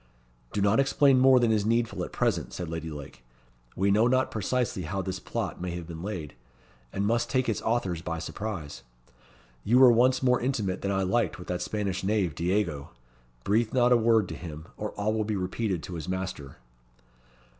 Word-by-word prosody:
"Do 105 - -1
not 100 +4 +3
explain 135 -1 +4
more 130 0 +6
than 120 -2 +3
is 105 -2 +2
needful 115 +2 0
at - - -6
present," - - -1
said 90 - -5
Lady 80 0 -5
Lake. 70 -5 -9 0.5
"We 100 +2 +2
know 110 +4 +4
not 130 +1 +2
precisely 115 -1 -1
how 95 +4 -3
this 95 0 -4
plot - - -4
may 90 -1 -3
have 85 -1 -6
been 80 -1 -8
laid, 90 -6 -5 0.6
and 100 - -1
must 115 +2 +1
take 130 -1 +1
its 115 - -1
authors 95 -8 -1
by 85 -1 -4
surprise. 85 - -5 0.8
You 120 +4 +3
were 130 -1 +8
once 125 +3 +3
more 125 -1 +3
intimate 110 -7 -1
than 100 - -2
I 95 -1 +1
liked 105 +5 0
with 90 - -10
that 90 0 -2
Spanish 100 -3 -2
knave, 95 -5 +1
Diego. 85 -3 -1 0.5
Breathe 110 - +1
not 125 -1 +4
a - - +7
word 115 -3 +3
to - - -5
him, 80 -2 -8
or 105 - -4
all 105 +1 -1
will 110 0 0
be 105 0 -2
repeated 95 -1 -2
to 90 - -7
his 80 0 -5
master." 95 -7 -5
100 Hz, 195 wpm, -27 LUFS, 90-115 Hz, 0.8 s, were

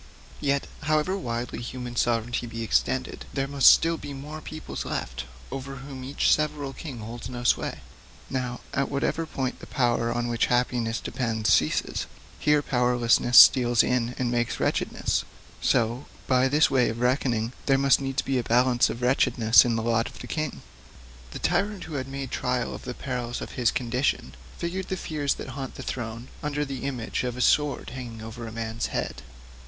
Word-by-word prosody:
Yet, 140 -1 +1 0.2
however 155 +5 +1
widely 120 -9 -4
human 125 0 -6
sovereignty 120 0 0
be 115 0 -5
extended, 130 +3 0
there 135 -1 0
must 140 -1 +6
still 165 0 +4
be 140 - -7
more 150 +3 -7
peoples 155 0 -6
left, - - -4 0.3
over 135 0 -5
whom 135 -1 -8
each 135 +2 +2
several 150 -2 -1
king 140 -5 -7
holds 115 +2 -7
no 120 -1 -6
sway. 120 - +1 0.5
Now, 125 -2 -3
at 140 -1 0
whatever 160 +3 -1
point 130 -3 -3
the - - -11
power 120 -2 +1
on 120 0 -1
which 120 -1 +1
happiness 120 -2 +1
depends 110 -3 0
ceases, - - +1 0.3
here 150 -1 +3
powerlessness 125 -1 +3
steals 120 -3 +8
in 125 -1 0
and 125 -2 0
makes 120 -1 0
wretchedness; - - 0 0.4
so, 120 +2 +1 0.2
by 130 0 +3
this 150 +2 +3
way 130 -3 +3
of 115 - -4
reckoning, 125 -2 +1
there 135 -1 +5
must 135 -1 +4
needs 135 0 -1
be 135 -2 0
a - - -2
balance 120 +1 +3
of 120 - -5
wretchedness 125 -3 +5
in 120 -2 +1
the 115 - -1
lot 115 0 +1
of 125 - -14
the - - -8
king. 155 -2 -3 0.7
The - - -7
tyrant 195 +2 0
who 160 - -8
had 135 -2 -3
made 135 -1 -5
trial 125 -1 -1
of - - -9
the 125 -1 -5
perils 125 -2 -4
of - - -6
his 120 -3 +2
condition 125 +2 -1 0.2
figured 185 +2 -3
the 190 - -2
fears 150 -5 -1
that - - -7
haunt 135 -1 -6
a - - -6
throne 115 0 -5
under 150 0 -1
the 135 -1 -5
image 130 -4 -2
of 125 -1 -3
a - - -2
sword 145 0 +2
hanging 120 -3 -7
over 115 +1 -7
a - - -7
man's 115 0 -3
head. 60 -1 -3
125 Hz, 180 wpm, -26 LUFS, 120-140 Hz, 0.7 s, steals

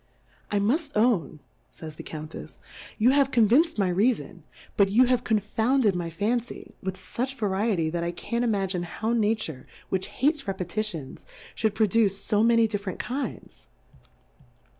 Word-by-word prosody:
I 205 - 0
muft 285 +10 0
own, 205 - +1 0.3
fajfs 155 -2 -9
tioe - - -9
Counttfs^ 155 0 -8 0.4
you 235 +3 +4
have 275 -1 +3
convinc'd 250 +7 +4
my 190 -3 +2
Reafoa, 195 -2 0 0.3
but 200 -1 +4
you 235 +6 +5
have 250 0 +1
confounded 220 +1 +1
my 175 -1 -2
Fancy, 220 +7 -3
with 190 0 -4
fuch 250 +8 -4
Va 225 - -2
riety, 190 -5 0
that 170 0 -2
I 170 - -1
can't 235 +7 -3
imagine 195 -5 0
how 215 +6 -2
Nature, 215 - -1 0.2
which 190 0 -1
hates 290 -1 0
Repetitions, 185 -5 -4 0.3
fhould 220 -2 0
pro 220 - +4
duce 200 -2 +1
fo 210 -1 +3
many 230 0 +4
different 205 -3 -4
Kinds. 255 -2 -5
210 Hz, 150 wpm, -26 LUFS, 185-235 Hz, 0.4 s, you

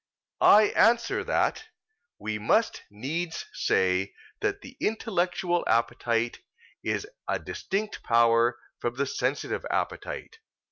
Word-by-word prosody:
I 210 0 +7
answer 235 +1 +3
that, - - 0 0.5
We 110 -1 -4
must 220 - +2
needs 155 +11 -4
say 95 +1 +1 0.2
that 405 -1 -1
the 265 -6 -12
intellectual 180 -5 0
appetite 115 0 +1 0.4
is - - -2 0.2
a - - +1
distinct 205 +2 -4
power 115 +1 +4 0.2
from 120 0 -2
the 140 +2 0
sensitive 135 +1 -2
appetite. 455 - -3
140 Hz, 105 wpm, -27 LUFS, -, 0.5 s, I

